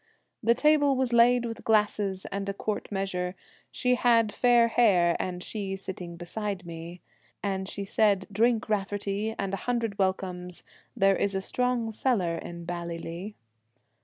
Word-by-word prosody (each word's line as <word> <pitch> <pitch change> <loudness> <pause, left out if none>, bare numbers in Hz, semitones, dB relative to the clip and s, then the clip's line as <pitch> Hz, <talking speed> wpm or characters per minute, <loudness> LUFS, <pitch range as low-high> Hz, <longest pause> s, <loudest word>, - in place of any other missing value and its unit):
The 235 0 +4
table 290 0 +4
was 255 -2 0
laid 240 +1 +5
with 230 -1 -6
glasses 210 -3 +1
and 200 0 -3
a 200 - -3
quart 215 +1 -3
measure, 190 -2 -2 0.4
She 250 0 +1
had 230 -3 +3
fair 240 -1 +4
hair, 185 -8 +4
and 180 -1 -3
she 200 -3 -4
sitting 180 -3 -7
beside 190 +1 -4
me; 170 +1 -8 0.4
And 190 -1 -2
she 200 - -5
said, 200 -2 +2
"Drink, 225 +2 +2
Raftery, 205 +1 -1
and 195 -1 -3
a - - 0
hundred 230 -4 -1
welcomes, 180 -2 -2 0.3
There 195 -2 +4
is 200 0 0
a - - +1
strong 245 +2 0
cellar 200 -8 0
in 170 0 -8
Ballylee." 170 +3 -5
200 Hz, 150 wpm, -28 LUFS, 185-230 Hz, 0.4 s, laid